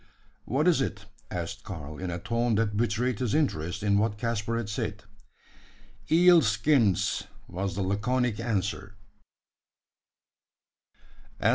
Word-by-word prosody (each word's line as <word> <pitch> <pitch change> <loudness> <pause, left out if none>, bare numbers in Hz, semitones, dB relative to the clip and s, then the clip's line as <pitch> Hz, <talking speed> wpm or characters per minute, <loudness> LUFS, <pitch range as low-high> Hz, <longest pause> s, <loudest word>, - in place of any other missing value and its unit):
"What 145 +8 +1
is 170 -6 +4
it?" 100 -5 -3 0.2
asked 90 +3 -5
Karl, 75 -5 -7
in 95 -1 -3
a 85 - -3
tone 115 +5 0
that 105 -1 0
betrayed 115 +1 0
his 120 -5 0
interest 100 - -1
in 100 -1 +3
what 105 -1 0
Caspar 115 0 -1
had 115 -3 -3
said. 105 -1 -4 1.1
"Eel 175 +1 +7
skins!" 110 - +2 0.2
was 95 0 -3
the 100 - -1
laconic 115 +4 0
answer. 100 -3 -2
105 Hz, 120 wpm, -28 LUFS, 100-120 Hz, 1.1 s, Eel